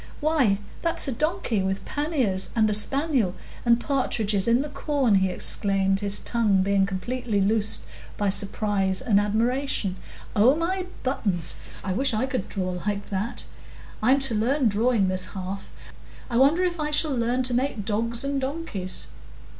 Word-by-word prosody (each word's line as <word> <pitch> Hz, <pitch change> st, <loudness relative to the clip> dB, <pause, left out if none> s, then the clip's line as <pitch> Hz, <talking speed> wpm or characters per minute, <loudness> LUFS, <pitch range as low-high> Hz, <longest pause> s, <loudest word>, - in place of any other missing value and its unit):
"Why, 290 Hz, -10 st, +2 dB, 0.2 s
that's 335 Hz, -2 st, +1 dB
a -, -, 0 dB
donkey 300 Hz, -, -1 dB
with 190 Hz, +1 st, -2 dB
panniers, 265 Hz, -, 0 dB
and 220 Hz, -2 st, +4 dB
a -, -, +1 dB
spaniel, 255 Hz, -, +1 dB, 0.3 s
and 235 Hz, -1 st, +4 dB
partridges 220 Hz, -7 st, 0 dB
in 235 Hz, +3 st, +3 dB
the 300 Hz, -, -6 dB
corn!" 280 Hz, -4 st, 0 dB
he 190 Hz, -1 st, +3 dB
exclaimed, 195 Hz, +1 st, +2 dB
his 200 Hz, 0 st, -1 dB
tongue 210 Hz, -5 st, +2 dB
being 195 Hz, 0 st, +2 dB
completely 215 Hz, +3 st, -2 dB
loosed 210 Hz, +2 st, +1 dB, 0.3 s
by 205 Hz, -1 st, +1 dB
surprise 195 Hz, -1 st, 0 dB
and 205 Hz, -4 st, +3 dB
admiration. 220 Hz, -1 st, 0 dB, 0.4 s
"Oh 230 Hz, +7 st, +5 dB
my 365 Hz, +3 st, -2 dB, 0.2 s
buttons! 200 Hz, -, 0 dB, 0.3 s
I 190 Hz, -, -2 dB
wish 255 Hz, +3 st, +1 dB
I 225 Hz, +4 st, +1 dB
could 255 Hz, -7 st, -3 dB
draw 185 Hz, -2 st, -3 dB
like 205 Hz, 0 st, -3 dB
that. 200 Hz, +4 st, -3 dB, 0.6 s
I'm 255 Hz, +5 st, +4 dB
to 270 Hz, -3 st, +5 dB
learn 245 Hz, +4 st, +2 dB
drawing 215 Hz, -1 st, +2 dB
this 185 Hz, 0 st, +1 dB
half; 190 Hz, +1 st, -5 dB, 0.6 s
I 235 Hz, -, +1 dB
wonder 290 Hz, +8 st, +4 dB
if 350 Hz, -2 st, -1 dB
I 300 Hz, 0 st, -1 dB
shall 300 Hz, -1 st, +1 dB
learn 245 Hz, +2 st, 0 dB
to 250 Hz, -1 st, +1 dB
make 245 Hz, -4 st, -1 dB
dogs 230 Hz, +3 st, -1 dB
and 275 Hz, 0 st, -1 dB
donkeys!" 265 Hz, -, -3 dB
225 Hz, 160 wpm, -25 LUFS, 195-270 Hz, 0.6 s, Oh